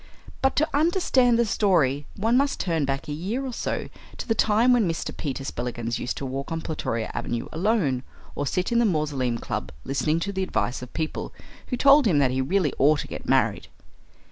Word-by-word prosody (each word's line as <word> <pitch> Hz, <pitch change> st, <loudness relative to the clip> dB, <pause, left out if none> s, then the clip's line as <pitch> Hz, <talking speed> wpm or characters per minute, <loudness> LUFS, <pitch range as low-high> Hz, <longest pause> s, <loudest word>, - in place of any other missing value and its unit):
But 265 Hz, 0 st, +2 dB
to 310 Hz, -, +2 dB
understand 285 Hz, -7 st, +3 dB
the 235 Hz, -, +3 dB
story 155 Hz, -, +2 dB
one 225 Hz, +4 st, +1 dB
must 275 Hz, +2 st, +2 dB
turn 165 Hz, -5 st, 0 dB
back 135 Hz, +3 st, -3 dB
a -, -, -4 dB
year 205 Hz, -, -3 dB
or 255 Hz, -, -4 dB
so -, -, -3 dB, 0.3 s
to -, -, -6 dB
the 225 Hz, -, +3 dB
time 225 Hz, +3 st, +3 dB
when 225 Hz, -7 st, +3 dB
Mr. 165 Hz, -, -3 dB
Peter 135 Hz, -3 st, -4 dB
Spillikins 120 Hz, -3 st, -3 dB
used 125 Hz, -, -3 dB
to 140 Hz, -, -4 dB
walk 135 Hz, +2 st, -4 dB
on 165 Hz, -, -1 dB
Plutoria 115 Hz, -9 st, -3 dB
Avenue 120 Hz, -1 st, -3 dB
alone, 165 Hz, -, +1 dB, 0.3 s
or 145 Hz, -, -3 dB
sit 180 Hz, -, -1 dB
in 235 Hz, -, +3 dB
the 235 Hz, -, +4 dB
Mausoleum 145 Hz, -, 0 dB
Club -, -, -4 dB
listening 155 Hz, +4 st, 0 dB
to 200 Hz, +3 st, -2 dB
the 190 Hz, -, -2 dB
advice 135 Hz, -9 st, -1 dB
of 125 Hz, -, -9 dB
people 160 Hz, -1 st, -3 dB, 0.3 s
who 250 Hz, -, -2 dB
told 280 Hz, -1 st, +6 dB
him 170 Hz, -7 st, +3 dB
that 135 Hz, -3 st, +3 dB
he 130 Hz, +1 st, 0 dB
really 155 Hz, +2 st, +1 dB
ought 150 Hz, +2 st, +4 dB
to -, -, -8 dB
get -, -, -7 dB
married. -, -, +2 dB
165 Hz, 205 wpm, -25 LUFS, 135-230 Hz, 0.3 s, told